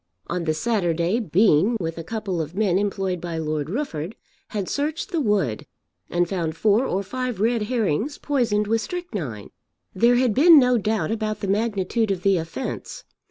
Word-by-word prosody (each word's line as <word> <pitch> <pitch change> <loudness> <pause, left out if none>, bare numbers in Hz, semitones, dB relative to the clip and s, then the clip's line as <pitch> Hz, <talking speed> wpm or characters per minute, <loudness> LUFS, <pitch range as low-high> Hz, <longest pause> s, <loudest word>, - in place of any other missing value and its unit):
On 175 0 -3
the 155 - +1
Saturday 175 0 0
Bean 200 +1 +3
with 165 -2 -3
a - - -5
couple 200 -3 -3
of 160 +3 -6
men 195 -3 +2
employed 195 -3 -2
by 170 -2 -4
Lord 155 -2 -2
Rufford, 200 - -3 0.3
had 205 -4 -3
searched 305 +6 -2
the 335 -4 0
wood, 195 - 0 0.4
and 175 0 +1
found 165 -4 -3
four 220 +6 +3
or 195 +2 -1
five 255 +1 -4
red 230 +2 +2
herrings 225 - -1
poisoned 235 -8 0
with 225 +2 +1
strychnine. 195 - -5 0.4
There 235 +5 +4
had 245 -2 +2
been 320 +6 +7
no 250 -3 +5
doubt 215 +1 -1
about 215 -2 -2
the 200 - -2
magnitude 215 +1 0
of 185 -2 -2
the 195 -2 +4
offence. 175 - -5
205 Hz, 170 wpm, -23 LUFS, 175-235 Hz, 0.4 s, been